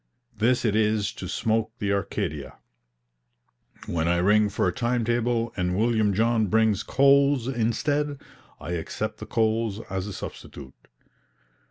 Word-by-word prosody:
This 120 Hz, +4 st, +1 dB
it 105 Hz, -2 st, +1 dB
is 105 Hz, -1 st, +1 dB
to -, -, -7 dB
smoke 115 Hz, -1 st, -1 dB
the 100 Hz, -2 st, -1 dB
Arcadia. 75 Hz, -7 st, -3 dB, 1.3 s
When 80 Hz, -1 st, -1 dB
I 85 Hz, 0 st, +2 dB
ring 105 Hz, +4 st, +3 dB
for 100 Hz, -, 0 dB
a -, -, 0 dB
time 120 Hz, -2 st, 0 dB
table 120 Hz, 0 st, 0 dB
and 90 Hz, -1 st, -1 dB
William 110 Hz, -2 st, +2 dB
John 115 Hz, 0 st, +2 dB
brings 110 Hz, 0 st, +2 dB
coals 140 Hz, 0 st, +3 dB
instead, 140 Hz, +4 st, -1 dB, 0.4 s
I -, -, -6 dB
accept 85 Hz, -2 st, -4 dB
the -, -, -8 dB
coals 110 Hz, -2 st, 0 dB
as 95 Hz, 0 st, -3 dB
a 105 Hz, -, -6 dB
substitute. 70 Hz, -6 st, -9 dB
110 Hz, 140 wpm, -25 LUFS, 100-120 Hz, 1.3 s, ring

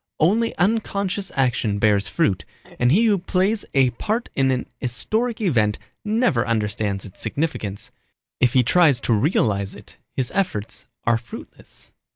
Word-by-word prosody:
Only 220 Hz, +9 st, +2 dB
unconscious 200 Hz, -1 st, 0 dB
action 125 Hz, -6 st, +1 dB
bears 100 Hz, -1 st, +2 dB
fruit, 105 Hz, -, 0 dB, 0.4 s
and 120 Hz, +1 st, +3 dB
he 215 Hz, +9 st, +4 dB
who 205 Hz, -3 st, +3 dB
plays 195 Hz, +4 st, 0 dB
a 130 Hz, -2 st, +4 dB
part 220 Hz, -, -2 dB
in 135 Hz, -1 st, +2 dB
an 130 Hz, -1 st, 0 dB
historic 215 Hz, -, -2 dB
event 115 Hz, -, +1 dB, 0.3 s
never 210 Hz, -, +1 dB
understands 105 Hz, -3 st, -1 dB
its 100 Hz, -, -7 dB
significance. 110 Hz, -6 st, -3 dB, 0.5 s
If 125 Hz, -1 st, +3 dB
he 130 Hz, -2 st, +5 dB
tries 145 Hz, 0 st, +5 dB
to 115 Hz, -, +1 dB
realize 105 Hz, -, +1 dB
it -, -, -14 dB, 0.2 s
his 130 Hz, -2 st, -1 dB
efforts 145 Hz, -, -2 dB, 0.2 s
are 115 Hz, 0 st, +2 dB
fruitless. 115 Hz, -, -11 dB
130 Hz, 145 wpm, -22 LUFS, -, 0.5 s, he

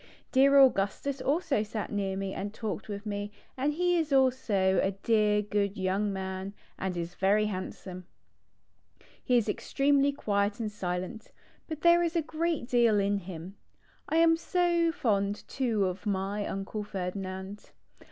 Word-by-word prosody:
Dear 275 Hz, +1 st, +5 dB
Augustus 265 Hz, +2 st, +3 dB
also 290 Hz, -, +1 dB
sat 215 Hz, 0 st, -4 dB
near 195 Hz, -2 st, -1 dB
me 195 Hz, 0 st, -3 dB
and 205 Hz, +1 st, -4 dB
talked 215 Hz, -1 st, -5 dB
with 205 Hz, 0 st, -5 dB
me 205 Hz, 0 st, -4 dB, 0.2 s
and 275 Hz, +3 st, 0 dB
he 355 Hz, +2 st, +2 dB
is 315 Hz, -2 st, -2 dB
also 235 Hz, -9 st, +3 dB
a 195 Hz, -, 0 dB
dear 210 Hz, -2 st, +3 dB
good 205 Hz, -1 st, -1 dB
young 195 Hz, +2 st, 0 dB
man, 190 Hz, +1 st, -5 dB, 0.2 s
and 185 Hz, -2 st, -2 dB
is 170 Hz, +1 st, -4 dB
very 205 Hz, +3 st, +2 dB
handsome. 185 Hz, -2 st, -6 dB, 1.2 s
He 250 Hz, -, +3 dB
is 230 Hz, -, +1 dB
ex 210 Hz, -, -4 dB
tremely 280 Hz, 0 st, +3 dB
quiet 200 Hz, -2 st, 0 dB
and 215 Hz, -2 st, -2 dB
silent, 185 Hz, +2 st, -4 dB, 0.4 s
but 315 Hz, -2 st, -6 dB
there 340 Hz, 0 st, +6 dB
is 340 Hz, 0 st, -1 dB
a 330 Hz, -, +2 dB
great 320 Hz, -3 st, -2 dB
deal 235 Hz, -4 st, +4 dB
in 200 Hz, 0 st, +1 dB
him. 180 Hz, +1 st, -9 dB, 0.5 s
1 320 Hz, -, +3 dB
am 330 Hz, 0 st, +5 dB
so 340 Hz, -1 st, +1 dB
fond 205 Hz, -, -1 dB
too 230 Hz, -7 st, 0 dB
of 185 Hz, +4 st, -4 dB
my 200 Hz, +1 st, -1 dB
Uncle 195 Hz, +2 st, -4 dB
Ferdinand. 190 Hz, +1 st, -5 dB
210 Hz, 155 wpm, -29 LUFS, 195-270 Hz, 1.2 s, there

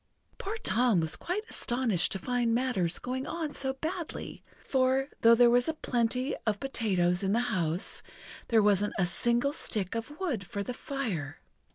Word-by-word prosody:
Poor 415 Hz, +3 st, -3 dB
Tom 240 Hz, -, +3 dB
was 160 Hz, -1 st, 0 dB
quite 380 Hz, +5 st, -3 dB
astonished 240 Hz, -, 0 dB
to -, -, -1 dB
find 240 Hz, +1 st, 0 dB
matters 235 Hz, -10 st, +1 dB
going 260 Hz, +2 st, -4 dB
on 320 Hz, -3 st, -3 dB
so 265 Hz, -1 st, 0 dB
badly, 320 Hz, +4 st, -5 dB, 0.2 s
for, 265 Hz, +1 st, +2 dB
though 230 Hz, 0 st, +7 dB
there 240 Hz, +1 st, +6 dB
was 245 Hz, +4 st, +3 dB
a 320 Hz, -, -1 dB
plenty 250 Hz, -1 st, 0 dB
of 210 Hz, -2 st, +1 dB
potatoes 185 Hz, -9 st, 0 dB
in 195 Hz, 0 st, +1 dB
the 230 Hz, -, +3 dB
house, 170 Hz, -1 st, -1 dB, 0.5 s
there 225 Hz, -3 st, +4 dB
wasn't 205 Hz, 0 st, +2 dB
a 190 Hz, -, +3 dB
single 240 Hz, +9 st, +1 dB
stick 200 Hz, -9 st, -2 dB
of 230 Hz, +7 st, -5 dB
wood 290 Hz, -, -1 dB
for 200 Hz, +2 st, -4 dB
the 250 Hz, -, -4 dB
fire. 220 Hz, -, -4 dB
240 Hz, 170 wpm, -30 LUFS, 200-265 Hz, 0.5 s, though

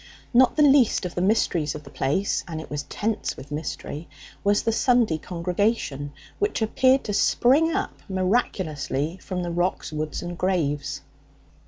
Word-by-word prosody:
Not 250 Hz, +1 st, +5 dB
the 300 Hz, -, +4 dB
least 270 Hz, -8 st, +5 dB
of 175 Hz, -, -4 dB
the 175 Hz, -, -2 dB
mysteries 180 Hz, -7 st, +1 dB
of 150 Hz, -, -7 dB
the 140 Hz, -, -13 dB
place, 145 Hz, +8 st, 0 dB
and 160 Hz, -2 st, -5 dB
it 160 Hz, -, -10 dB
was 145 Hz, -1 st, -2 dB
tense 210 Hz, +9 st, -3 dB
with 135 Hz, +2 st, -11 dB
mystery, 150 Hz, +1 st, -5 dB, 0.3 s
was 205 Hz, +1 st, +2 dB
the 225 Hz, -, +1 dB
Sunday 230 Hz, -8 st, +2 dB
congregation, 175 Hz, -, -1 dB, 0.3 s
which 415 Hz, 0 st, 0 dB
appeared 260 Hz, +4 st, +3 dB
to 205 Hz, -, -3 dB
spring 275 Hz, +10 st, +3 dB
up 390 Hz, +3 st, -3 dB
miraculously 185 Hz, -, -1 dB
from 180 Hz, -2 st, -4 dB
the 175 Hz, -, -3 dB
rocks, 175 Hz, +1 st, -1 dB
woods 155 Hz, +1 st, -3 dB
and 175 Hz, 0 st, -5 dB
graves. 160 Hz, -6 st, -1 dB
180 Hz, 160 wpm, -25 LUFS, 155-225 Hz, 0.3 s, Not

